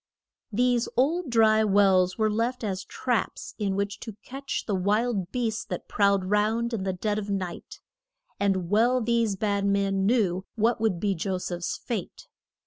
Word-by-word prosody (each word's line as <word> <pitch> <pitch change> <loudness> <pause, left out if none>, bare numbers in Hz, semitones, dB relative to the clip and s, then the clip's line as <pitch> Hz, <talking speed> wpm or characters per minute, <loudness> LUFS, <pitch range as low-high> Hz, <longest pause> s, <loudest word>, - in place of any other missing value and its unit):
These 245 +2 +1
old 310 +5 +1
dry 220 -2 +4
wells 195 -3 +3
were 215 -1 +2
left 235 +3 -1
as 190 -3 -2
traps 245 -3 -2
in 200 -2 0
which 200 0 -2
to 220 -3 -8
catch 270 +1 -4
the 210 - -2
wild 200 0 0
beasts 230 -4 -1
that - - -6
prowled 200 -2 +2
round 215 +4 +1
in 220 - -2
the 190 - 0
dead 210 +3 -1
of 205 -1 -6
night, 185 -3 -4 0.6
and 190 -3 0
well 240 +4 +4
these 230 -3 +1
bad 200 0 0
men 195 -1 +1
knew 195 -6 +1
what 225 0 +1
would 210 -6 +1
be 200 +1 +1
Jo 185 +2 -2
seph's 175 -1 -4
fate. 215 -7 -5
210 Hz, 165 wpm, -26 LUFS, 195-230 Hz, 0.6 s, dry